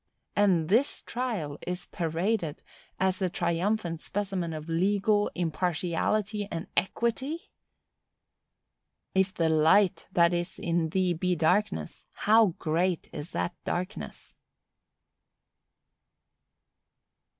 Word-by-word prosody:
And 185 -6 +3
this 235 - +2
trial 215 - -3
is 180 0 -3
paraded 170 0 -1 0.4
as 190 0 +1
a 185 - +2
triumphant 170 0 -1
specimen 190 -4 -2
of 155 0 -6
legal 200 +5 +2
impartiality 180 +5 0
and 165 0 -4
equity! 250 - -1 1.6
"If 190 0 +2
the 165 -3 0
light 160 +5 +4
that 170 -1 +4
is 175 +1 -2
in 165 -1 0
thee 185 +1 +1
be 180 +2 0
darkness, 175 +6 0
how 215 -4 +4
great 170 +2 0
is 150 +3 -6
that 175 - -2
darkness!" 185 +4 -5
180 Hz, 95 wpm, -28 LUFS, 165-205 Hz, 1.6 s, light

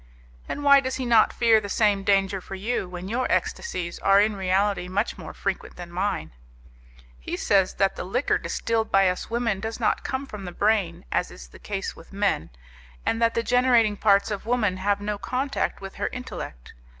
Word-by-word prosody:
"And 290 - -4
why 280 -1 +7
does 260 -1 -2
he 260 - -3
not 230 -2 +5
fear 225 -2 +4
the 200 - -6
same 205 -2 +2
danger 195 -1 +2
for 195 - -8
you, 195 -1 -2
when 180 +1 -7
your 245 +5 -1
ecstasies 175 - -2
are 195 0 +5
in 210 +1 +2
reality 190 0 +1
much 200 +5 -1
more 165 -5 -8
frequent 195 -2 -4
than 175 -1 -9
mine?" 185 - -2 0.9
"He - - -4
says 195 -2 +2
that 195 -1 +1
the - - -4
liquor 240 +9 0
distilled 225 -1 -1
by 195 -1 +5
us 180 - -4
women 230 -4 0
does 225 +3 -5
not 225 - +1
come 260 +2 -3
from 210 -7 -8
the 180 - -5
brain, 205 - 0
as - - 0
is - - -12
the - - -15
case 195 -2 -4
with 165 - -15
men, 195 - 0 0.6
and 225 - 0
that 230 0 +3
the 230 - +1
generating 245 -3 +3
parts 200 0 +3
of 205 +1 -4
woman 220 -6 +1
have 200 +2 0
no 205 0 -3
contact 270 +1 -2
with 195 0 -7
her - - -1
intellect. 250 - -7
205 Hz, 200 wpm, -25 LUFS, 190-230 Hz, 0.9 s, why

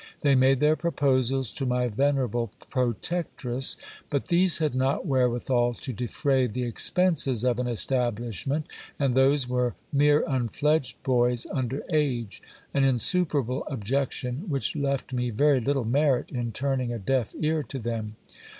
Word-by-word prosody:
They 140 -2 +4
made 130 0 +4
their 150 +1 +4
proposals 135 -6 0
to 140 - -5
my 125 -1 +1
venerable 120 -2 0 0.2
protectress; 130 - -1 0.3
but 140 +3 -2
these 175 0 +3
had 155 -4 0
not 130 +6 0
wherewithal 125 -3 +1
to 130 - -6
defray 130 +3 0
the 125 +3 -3
expenses 135 - +1
of 125 -1 +1
an 125 - -1
establishment, 120 - -1 0.3
and 135 -3 +1
those 135 0 +3
were 125 -1 0 0.2
mere 145 +1 +4
unfledged 135 +1 0
boys 125 -2 +2
under 130 0 -2
age; 130 -9 -1 0.3
an 140 - +2
insuperable 135 0 +1
objection, 130 - -2
which 140 0 -1
left 140 -3 -2
me 125 -1 -1
very 140 +4 +3
little 135 0 0
merit 135 +2 +1
in 120 -3 -3
turning 130 -1 -1
a 120 - -3
deaf 120 +2 -1
ear 155 0 +1
to 140 - -7
them. 110 -3 -4
130 Hz, 140 wpm, -26 LUFS, 120-140 Hz, 0.3 s, They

